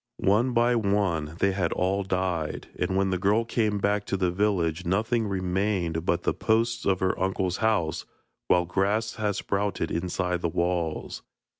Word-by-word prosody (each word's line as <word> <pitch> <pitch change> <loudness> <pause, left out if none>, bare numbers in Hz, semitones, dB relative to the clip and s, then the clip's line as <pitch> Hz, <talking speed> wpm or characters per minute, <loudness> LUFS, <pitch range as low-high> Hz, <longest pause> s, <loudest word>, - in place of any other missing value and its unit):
One 110 +6 +2
by 120 +1 +3
one 100 -8 0
they 100 +1 +2
had 95 -3 -1
all 95 +2 0
died, 90 -4 -2
and 95 - -1
when 95 0 +1
the 90 - 0
girl 105 +5 +2
came 110 -3 0
back 100 +1 +1
to 100 - -1
the 90 -2 +1
village 90 -3 0
nothing 110 +5 0
remained 95 -3 -1
but 85 0 +1
the - - +1
posts 115 +1 0
of 95 -2 +1
her 95 0 +1
uncle's 95 -1 0
house, 105 -8 0 0.4
while 90 -1 +3
grass 100 +6 0
had 105 -2 0
sprouted 100 -4 -2
inside 90 +1 -1
the 85 - 0
walls. 85 -1 -2
95 Hz, 165 wpm, -26 LUFS, 90-105 Hz, 0.4 s, by